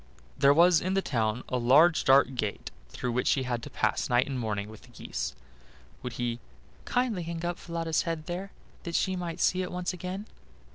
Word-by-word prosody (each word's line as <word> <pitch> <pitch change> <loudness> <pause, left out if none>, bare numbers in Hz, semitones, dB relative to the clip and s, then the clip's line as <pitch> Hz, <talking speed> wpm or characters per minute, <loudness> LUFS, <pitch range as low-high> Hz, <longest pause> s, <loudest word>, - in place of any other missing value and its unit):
There 140 - +5
was 170 +2 +5
in 185 +2 -1
the 195 - +1
town 110 -2 -1
a 125 - -1
large 150 +8 +5
dark 135 0 +5
gate, 105 -5 -3 0.2
through 125 - -3
which 125 +1 0
she 135 - +3
had 120 -2 -2
to - - -8
pass - - 0
night 125 +1 +3
and 135 -2 -3
morning 105 -3 -2
with 110 0 -12
the - - -17
geese; - - -5 0.7
would 125 - -5
he 120 0 -2 0.5
"kindly 245 -7 0
hang 170 0 -4
up 175 0 -2
Falada's 165 -2 -1
head 165 -3 -3
there, 185 +4 -5 0.3
that 170 -1 -5
she 190 -1 +1
might 175 -2 -4
see 185 - +2
it 180 - -4
once 180 0 -2
again?" 185 +3 -5
155 Hz, 200 wpm, -28 LUFS, 120-175 Hz, 0.7 s, There